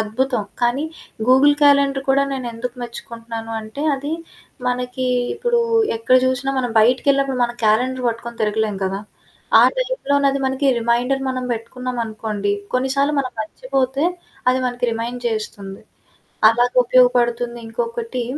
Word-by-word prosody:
అద్భుతం, 230 +1 -1 0.2
కానీ 245 +5 +1 0.4
Google 270 +3 +6
calendar 280 -1 +4
కూడా 275 +1 +4
నేనెందుకు 245 -2 -5
మెచ్చుకుంటన్నాను 230 -1 -7
అంటే, 220 +6 -7
అది 285 +3 -4 0.6
మనకీ 250 +1 -2 0.3
ఇప్పుడూ 480 -1 +1 0.4
ఎక్కడ 230 +3 +3
జూషినా 260 +1 0
మనం 245 -3 -1
బయటికెళ్ళినప్పుడు 265 +3 +2
మనం 240 0 -4
క్యాలెండర్ 250 +4 +2
బట్టుకొని 235 0 -6
తిరగలేం 215 -1 0
కదా! 190 +1 -2 0.6
ఆ - - +7
టైపులోనది 285 - +1
మనకి 265 +2 0
రిమైండర్ 245 +4 +1
మనం 255 -1 -3
బెట్టుకున్నామనుకోండి, 225 -3 -3 0.2
కొన్నిసార్లు 275 +3 +1
మనం 255 -2 -4
మర్చిపోతే, 265 +5 -1 0.4
అది 255 +1 +3
మనకి 245 0 -3
రిమైండ్ 235 +2 -4
చేస్తుంది. 205 -3 -5 0.7
అలాగుపయోగపడుతుంది, 245 0 +2
ఇంకొకటీ 235 +1 -3
245 Hz, 115 wpm, -20 LUFS, 230-265 Hz, 0.7 s, ఆ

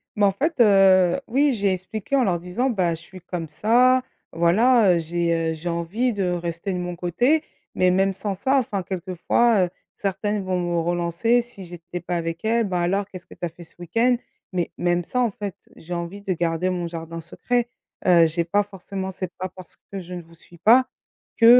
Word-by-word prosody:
Mais 205 - +3
en 195 - +4
fait, 295 - -2
heu, 195 -2 +5
oui. 275 +3 +3
J'ai 200 -3 +1
expliqué 195 +7 -3
en 265 - +4
leur 180 -6 +1
disant: 180 +10 -1
«Bah, 180 -8 +1
je 165 - -11
suis 185 +1 -13
comme 175 -2 -5
ça, 250 +9 +4 0.3
voilà, 195 +5 +4
heu, 170 - +1
j'ai, 165 0 0
heu, - - -2
j'ai 160 +2 -5
envie 180 +9 -1
de 200 -2 -1
rester 170 +2 -3
de 180 - -2
mon 180 0 -4
côté» 240 - +1 0.3
mais 185 0 +3
même 195 +1 +2
sans 200 +1 -3
ça 260 +9 +1
enfin 205 -6 -2
quelquefois, 185 +3 +1
heu, - - -6 0.3
certaines 200 +1 -2
vont 185 -1 -1
me 175 -1 0
relancer 175 +8 +1
si 205 -6 -11
j'étais 175 0 -8
pas 175 +1 -3
avec 165 +1 -4
elle: 230 0 +2
«Ben, 180 -2 -1
alors 195 +3 +1
qu'est-ce 185 -2 -11
que - - -13
tu - - -4
as 170 - -3
fait 170 +2 -13
ce 165 - -19
week-end?» 230 +9 +2 0.3
mais 180 -3 -2
même 175 0 +1
ça 250 - -2
en 240 - +3
fait 200 -1 -5 0.2
j'ai 175 +2 -8
envie 175 +4 -5
de 195 - 0
garder 170 +1 0
mon 175 -1 -2
jardin 165 0 -6
secret, 245 +8 -1 0.4
heu, 170 -2 +7
j'ai 165 +1 0
pas 205 +5 +1
forcément 195 -1 -6
c'est 185 -1 -5
pas 185 - -3
parce 185 -2 -12
que 195 - -4
je 180 0 -8
ne 175 - -7
vous 165 +1 -19
suis 170 +1 -17
pas 240 +9 +5 0.5
que, 230 - +4
185 Hz, 215 wpm, -23 LUFS, 170-210 Hz, 0.5 s, heu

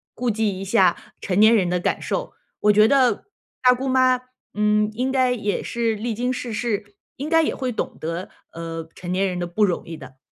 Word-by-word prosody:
顾 245 -1 0
忌 210 -3 -1
一 - - -5
下 190 -3 +3 0.2
成 185 - -1
年 220 +2 +7
人 185 -5 +2
的 180 0 0
感 - - -1
受。 - - -3 0.3
我 210 - +5
觉 215 +1 +6
得， 260 -1 +3 0.4
大 250 0 +6
姑 260 +2 -4
妈， 255 -1 +3 0.3
嗯， 210 0 +2
应 250 +4 -1
该 255 -2 +2
也 210 -4 -2
是 230 -1 -1
历 225 +2 -3
经 245 +3 -1
世 245 -2 -4
事， 210 -3 -3 0.2
应 280 - -4
该 325 0 +5
也 - - 0
会 255 -2 -2
懂 - - -4
得， 165 +3 -4 0.2
呃， 165 -1 -6
成 175 -1 -6
年 190 +2 +1
人 180 -1 -3
的 175 - -1
不 205 +5 +2
容 180 -3 -2
易 165 -1 -7
的。 130 -1 -13
215 Hz, 235 characters per minute, -22 LUFS, 185-250 Hz, 0.4 s, 年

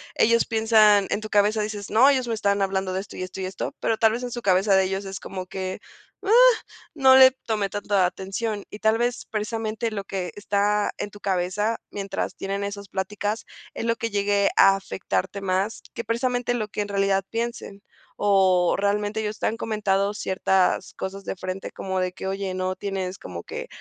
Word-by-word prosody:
ellos 230 +1 +4
piensan 220 -3 +4
en 205 - -1
tu 215 - -7
cabeza, 210 +1 +3
dices, 210 -1 -4
no, 245 +6 +6
ellos 260 -3 +1
me 230 - -1
están 200 -2 +1
hablando 190 -1 0
de 185 - -1
esto, 200 - -9
y 185 - -4
esto, 185 +1 -7
y 190 - -2
esto, 185 +1 -4
pero 225 - 0
tal 220 -1 +4
vez 240 +2 -3
en 245 - -4
su 240 - -4
cabeza 195 0 +3
de 190 - +5
ellos 190 +1 -2
es 195 -1 -6
como 185 -1 -6
que, 185 0 -4 0.4
ah, 395 - -3 0.6
no 265 -3 +6
le 260 0 +9
tomé 220 -6 -3
tanta 205 -2 +1
atención. 200 +3 -3
Y 210 - -9
tal 220 +1 +3
vez, 240 +1 -1
precisamente 220 +1 -3
lo 200 -2 -4
que 185 -4 -4
está 205 0 +1
en - - -4
tu 205 0 -14
cabeza, 195 +4 0
mientras 195 -1 -4
tienen 200 +1 -3
esas 200 -1 -6
pláticas, 205 +3 -3 0.3
es - - -4
lo 230 0 +2
que 230 0 -3
llegue 200 -1 +2
a 195 0 +7
afectarte 190 0 -3
más 195 +2 -1
que 235 - -5
precisamente 245 +2 0
lo 220 -3 -2
que 210 - -4
en 205 - -4
realidad 195 -1 +1
piensen. 230 -3 -4 0.3
O 190 -3 +3
realmente 205 +2 0
ellos 215 0 -4
te - - 0
han 225 - -2
comentado 205 -3 0
ciertas 190 -2 +1
cosas 195 +1 -6
de - - -3
frente 185 +1 -5
como 190 -1 -3
de 185 0 -1
que 190 - -6
oye, 195 0 -3
'¿no 185 0 -2
tienes 190 -1 -4
como - - -8
que 485 +1 -6
200 Hz, 200 wpm, -24 LUFS, 190-220 Hz, 0.6 s, le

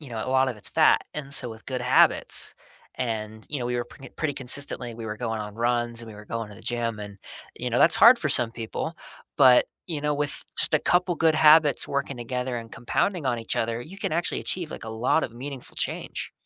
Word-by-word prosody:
you 145 - -11
know, 110 -2 -4
a - - -2
lot 130 0 +3
of 120 - -4
it's 105 - -7
fat, - - +4
and 140 -2 -6
so, 125 - -1
with 110 0 -12
good 130 -2 -3
habits 125 - +2 0.4
and, 110 -3 -4
you 145 - -2
know, 120 - -2
we 125 - -2
were 120 - -1
pr 135 - -15
pretty 155 -4 -1
consistently 125 -2 -2
we 115 -1 -8
were 105 0 -4
going 110 -2 -3
on 105 0 -7
runs 120 0 0
and 115 - -10
we - - -11
were 105 - -11
going 115 -2 -4
to 105 - -11
the - - -13
gym 115 -2 -2
and, 100 -1 -8 0.4
you 125 - -3
know, 120 - +1
that's 165 - +6
hard 235 +2 +8
for 155 - -1
some 120 -3 +4
people, 120 +8 -4 0.4
but, 130 -4 +7 0.2
you 160 -4 -3
know, 150 0 0
with 145 0 -3 0.2
just - - +2
a - - +5
couple 180 0 +2
good 160 -1 +3
habits 155 -2 +5
working 140 -1 -2
together 125 +1 -3
and 115 -1 -7
compounding 155 - -1
on 120 -2 +1
each 115 - -4
other, 115 +1 -1
you 190 +10 -10
can - - -2
actually 170 +1 -1
achieve, 175 -4 -3
like, - - -7
a - - -6
lot 120 +8 +1
of 115 - -6
meaningful 135 +1 -8
change. - - -4
125 Hz, 240 wpm, -26 LUFS, 115-145 Hz, 0.4 s, hard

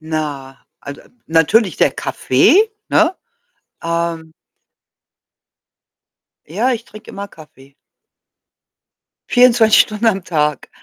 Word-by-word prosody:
Na, 150 -4 -6 0.2
also, 140 0 -10 0.2
natürlich 165 +4 +2
der - - +2
Kaffee, 330 - +1 0.2
ne? 330 +3 +2 0.7
Ähm 165 -1 -3 2.1
Ja, 220 - -1
ich 235 -2 -4
trinke 215 +1 -15
immer 200 0 -7
Kaffee. 150 -5 -18 1.6
24 240 -3 +5
Stunden 215 +2 -4
am 195 -4 0
Tag. 150 -5 -2
170 Hz, 90 wpm, -16 LUFS, 150-225 Hz, 2.1 s, 24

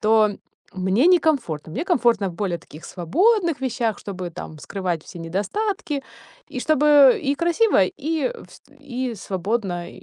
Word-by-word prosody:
то 215 -1 +3 0.4
мне 190 - +2
некомфортно. 275 - +2
Мне 285 - -3
комфортно 235 - +2
в - - -7
более 180 -3 -2
таких 155 0 -14
свободных 340 - +1
вещах, 235 -4 -1
чтобы, 185 -3 -6
там, 160 -1 -9
скрывать 175 -1 -3
все 175 - -11
недостатки 280 - -2 0.5
и - - -4
чтобы 295 -2 +5
и 280 +1 +2
красиво, 345 - +2 0.2
и 320 - -1 0.2
вст - - -17 0.2
и 255 -3 -4
свободно, 190 -2 -3
и, - - -14
230 Hz, 145 wpm, -22 LUFS, 185-300 Hz, 0.5 s, чтобы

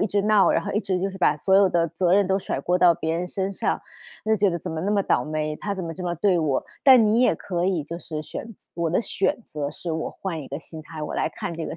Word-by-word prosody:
一 - - +2
直 200 -1 0
闹， 210 -1 +4
然 - - 0
后 - - -3
一 210 - +1
直 185 -3 -1
就 195 +1 -1
是 190 - -10
把 150 -4 +3
所 190 +5 +3
有 195 -1 +6
的 170 -1 +1
责 175 +2 +1
任 200 -1 +4
都 190 - +2
甩 135 - -3
锅 180 +4 +1
到 175 -1 +6
别 160 0 -2
人 180 - -2
身 195 +1 -2
上。 - - -1 0.4
就 220 0 +2
觉 200 0 +3
得： 170 - -2
“怎 180 - -4
么 160 - -3
那 205 +3 0
么 200 -1 +2
倒 125 - +1
霉， 155 0 -2
他 200 -1 -3
怎 190 - -5
么 165 - -4
这 180 - -7
么 175 0 -1
对 180 +1 +2
我？” 150 -5 0 0.2
但 255 -5 +8
你 225 +3 +3
也 210 - +4
可 175 +1 -2
以 180 -5 0
就 170 +3 -6
是 155 -3 -6
选 - - -7
择 - - -15
我 170 -1 -1
的 180 - +2
选 235 +3 -1
择 145 -2 -4
是 165 +3 -6
我 160 - -2
换 170 -5 -5
一 - - -10
个 140 +3 -5
心 160 -1 -10
态， 155 -1 -8
我 - - -4
来 155 - 0
看 170 - -6
这 165 - -4
个 - - -6
175 Hz, 325 characters per minute, -24 LUFS, 160-195 Hz, 0.4 s, 但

